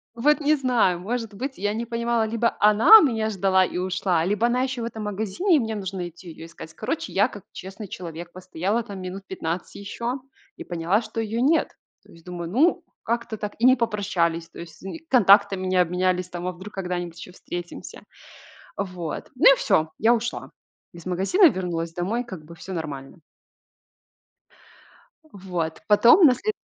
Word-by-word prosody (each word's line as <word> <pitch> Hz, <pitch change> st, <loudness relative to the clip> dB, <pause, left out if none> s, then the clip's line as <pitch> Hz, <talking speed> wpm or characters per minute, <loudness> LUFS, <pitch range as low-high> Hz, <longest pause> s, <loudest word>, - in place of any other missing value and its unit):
Вот 295 Hz, +7 st, +3 dB
не 300 Hz, +1 st, +3 dB
знаю. 245 Hz, -, +1 dB
Может 225 Hz, +2 st, -4 dB
быть, 265 Hz, +7 st, -5 dB
я 205 Hz, +1 st, -1 dB
не 230 Hz, +2 st, -3 dB
понимала, 235 Hz, -1 st, 0 dB
либо 230 Hz, +1 st, 0 dB
она 215 Hz, -, +8 dB
меня 225 Hz, -7 st, +1 dB
ждала 190 Hz, -1 st, +3 dB
и -, -, -5 dB
ушла, 185 Hz, -2 st, 0 dB
либо 205 Hz, +4 st, +1 dB
она 245 Hz, +1 st, +1 dB
ещё 260 Hz, -2 st, -2 dB
в -, -, -2 dB
этом 225 Hz, -2 st, -6 dB
магазине, 215 Hz, -, 0 dB
и -, -, +4 dB
мне 225 Hz, -3 st, -3 dB
нужно 190 Hz, -3 st, -4 dB
идти 175 Hz, +1 st, -13 dB
её 160 Hz, 0 st, -10 dB
искать. 165 Hz, -1 st, -11 dB
Короче, 330 Hz, +1 st, -4 dB
я 205 Hz, +3 st, +3 dB
как 205 Hz, -6 st, -11 dB
честный 195 Hz, +2 st, -9 dB
человек 170 Hz, -1 st, -8 dB
постояла 185 Hz, +5 st, -2 dB
там 200 Hz, -3 st, -8 dB
минут 185 Hz, +2 st, -7 dB
15 170 Hz, -1 st, -5 dB
ещё 235 Hz, +6 st, -4 dB, 0.4 s
и -, -, -8 dB
поняла, 175 Hz, +5 st, 0 dB
что 220 Hz, 0 st, -6 dB
её 225 Hz, +1 st, -2 dB
нет. 310 Hz, +5 st, +2 dB, 0.3 s
То -, -, -19 dB
есть 165 Hz, -1 st, -18 dB
думаю: 175 Hz, -2 st, -6 dB
"Ну, 300 Hz, -, +2 dB, 0.2 s
как-то 235 Hz, -1 st, -2 dB
так 205 Hz, 0 st, -5 dB
и 235 Hz, -, +2 dB
не 255 Hz, 0 st, +7 dB
попрощались, 190 Hz, -8 st, -1 dB
то -, -, -13 dB
есть 170 Hz, -1 st, -11 dB
нь 195 Hz, +11 st, -6 dB
контактами 200 Hz, -5 st, +5 dB
не 185 Hz, 0 st, 0 dB
обменялись 180 Hz, +1 st, 0 dB
там, 175 Hz, 0 st, -5 dB
а -, -, -1 dB
вдруг 185 Hz, +4 st, -11 dB
когда-нибудь 175 Hz, -3 st, -4 dB
ещё 180 Hz, -, -10 dB
встретимся?" 175 Hz, -1 st, -8 dB, 0.7 s
Вот, 180 Hz, -5 st, -5 dB
ну, 385 Hz, -, +7 dB
и -, -, -8 dB
всё. 160 Hz, -, +1 dB
Я 230 Hz, +3 st, +4 dB
ушла 240 Hz, +1 st, -4 dB, 0.4 s
из 170 Hz, 0 st, -13 dB
магазина 195 Hz, -, +3 dB
и -, -, +6 dB
вернулась 170 Hz, -4 st, -4 dB
домой. 195 Hz, +8 st, -1 dB
Как 185 Hz, -10 st, -10 dB
бы 170 Hz, +2 st, -12 dB
всё 185 Hz, +3 st, -8 dB
нормально. 145 Hz, -1 st, -6 dB, 2.1 s
Вот, 180 Hz, -4 st, -4 dB
потом 240 Hz, -, +7 dB
на 265 Hz, -, +7 dB
след 430 Hz, -, -2 dB
195 Hz, 180 wpm, -24 LUFS, 180-235 Hz, 2.1 s, она